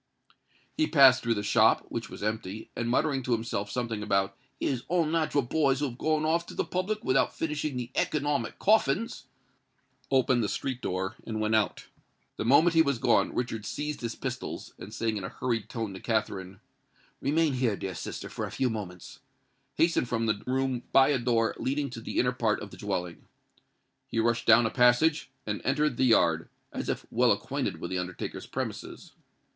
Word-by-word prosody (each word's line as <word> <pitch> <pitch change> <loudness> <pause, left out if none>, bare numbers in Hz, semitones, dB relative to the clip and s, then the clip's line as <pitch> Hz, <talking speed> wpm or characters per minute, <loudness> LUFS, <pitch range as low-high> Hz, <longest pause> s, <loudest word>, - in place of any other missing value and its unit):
He 310 - +2
passed 135 -4 +7
through 115 -1 +1
the 105 - -2
shop, - - +4
which - - -4
was - - -8
empty; 105 -1 -4
and, 120 0 -2
muttering 135 +2 +1
to 125 -1 -1
himself 110 -3 -2
something 115 -4 -3
about 100 -2 0 0.2
"his 130 -3 -1
unnat'ral 160 -4 +1
boys 140 -2 +2
who 145 -1 0
had 120 - -12
gone 155 -1 +1
off 170 +2 +1
to - - -9
the - - 0
public 200 +4 -2
without 130 - +2
finishing 150 -3 -2
the 125 0 -5
economic 145 -4 0
coffins," 210 -5 +1 0.8
opened 130 -3 +3
the 105 - -1
street 130 -2 -3
door 95 +1 -3
and 110 -1 -4
went 110 0 0
out. 110 -3 +1 0.5
The - - -3
moment 155 +8 +5
he 165 - +6
was 140 -4 +1
gone, - - +2
Richard 115 -3 -2
seized 150 +7 -4
his 115 -1 -3
pistols, - - -5
and 100 - -9
saying 110 0 -1
in 100 - -5
a 90 - -4
hurried 115 -4 -2
tone 110 -4 -4
to 95 - -8
Katharine, 100 -4 -2 0.6
"Remain 150 +1 +2
here, 125 -5 +1
dear 95 - -4
sister, - - -6
for - - -4
a - - -7
few 130 -3 0
moments," 95 -5 -7 0.6
hastened 165 -7 +2
from 115 -1 0
the 105 -2 0
room 130 -1 0
by 135 +1 +6
a 140 -3 +2
door 115 -2 +1
leading 140 0 -1
to 115 - -7
the - - -5
inner 125 - +3
part 115 -4 0
of 100 - -8
the - - -11
dwelling. 90 -4 -4 0.8
He - - -5
rushed 115 +1 +1
down 115 +1 +7
a 110 - 0
passage, 125 +6 +3 0.2
and 105 -1 -3
entered 150 -1 +1
the 130 - +3
yard—as 85 -9 +1
if - - -2
well - - +4
acquainted - - -1
with - - -5
the 90 - 0
undertaker's 90 0 -5
premises. - - -6
120 Hz, 185 wpm, -28 LUFS, 110-140 Hz, 0.8 s, passed